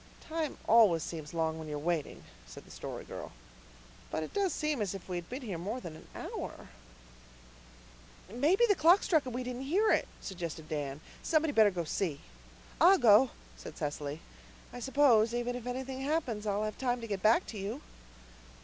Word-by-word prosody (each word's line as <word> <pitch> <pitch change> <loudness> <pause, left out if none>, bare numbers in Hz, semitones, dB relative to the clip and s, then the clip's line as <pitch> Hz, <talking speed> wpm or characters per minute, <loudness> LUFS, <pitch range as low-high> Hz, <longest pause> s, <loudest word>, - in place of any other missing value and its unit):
"Time 320 -2 -3
always 210 -8 +6
seems 155 -3 -6
long 160 -1 -1
when 160 - -7
you're 150 -1 -3
waiting," 160 0 -2 0.2
said - - -11
the - - -15
Story - - -6
Girl. - - -7 0.8
"But 160 - -2
it - - -8
does 395 -3 +1
seem 300 -6 -1
as 195 -2 -1
if 195 - -9
we 180 - -3
had 175 -1 -5
been 255 +2 -5
here 195 -8 -4
more 210 +8 -3
than 170 -9 -8
an - - -14
hour." - - -6 1.6
"Maybe 295 - +3
the 410 - +5
clock 355 +2 +5
struck 315 -7 +2
and 245 - -5
we 255 - -2
didn't 250 0 -5
hear 370 +11 +2
it," - - +2
suggested 170 -4 -6
Dan. 145 -2 -4 0.2
"Somebody'd 310 -2 +1
better 220 -4 +6
go 180 -3 -3
and 165 - -6
see." 160 -6 -1 0.6
"I'll 380 +3 +8
go," 240 - +6 0.3
said - - -10
Cecily. 145 0 -4 0.5
"I 245 - -6
suppose, 240 -4 +4
even 240 0 -1
if 245 -1 -6
anything 260 +1 -4
happens, 270 -8 -1
I'll 205 +1 0
have 215 0 -4
time 245 -2 0
to - - -5
get 200 -3 -3
back 220 +3 +4
to 215 - -6
you." 215 +9 -5
225 Hz, 190 wpm, -32 LUFS, 170-270 Hz, 1.6 s, I'll